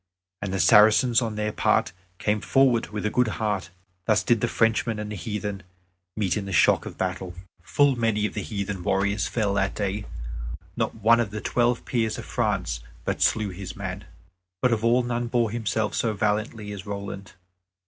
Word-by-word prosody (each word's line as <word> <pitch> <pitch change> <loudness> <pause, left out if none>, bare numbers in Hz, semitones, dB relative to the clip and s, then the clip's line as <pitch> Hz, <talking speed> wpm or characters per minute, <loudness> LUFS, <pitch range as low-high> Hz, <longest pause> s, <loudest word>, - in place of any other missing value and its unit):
And 100 -1 -3
the 95 - -1
Saracens, 110 - +6
on 110 -3 -2
their 105 0 -1
part, - - +2 0.3
came 105 +2 0
forward 130 -4 +3
with 105 0 -5
a 110 - +1
good 125 -1 +2
heart. 105 -6 -1 0.4
Thus 105 0 +3
did 115 -3 +2
the 120 - +2
Frenchmen 115 -1 +1
and 105 0 -5
the - - -4
heathen 105 -2 -4 0.6
meet 100 -5 +1
in 100 -2 -3
the - - -5
shock - - +4
of - - -9
battle. 90 -1 -3 0.3
Full 140 +10 +3
many 115 -3 +1
of 105 - -3
the - - -3
heathen 100 -3 -4
warriors 100 +2 +1
fell 105 -4 0
that 95 -1 0
day. 100 0 -2 0.7
Not - - -1
one 115 +2 +4
of 115 -4 0
the 110 +1 -5
Twelve 120 +2 +1
Peers 110 -3 0
of - - -7
France - - -1 0.3
but - - -2
slew 110 -2 +2
his 95 0 -7
man. 95 -1 -5 0.5
But 125 +4 +3
of 110 -1 -1
all 120 +2 +4
none 120 0 -2
bore 120 -2 +1
himself 110 -1 -1
so 115 -2 0
valiantly 105 +1 -1
as 100 -2 -6
Roland. 100 -1 -6
105 Hz, 190 wpm, -25 LUFS, 100-115 Hz, 0.7 s, Saracens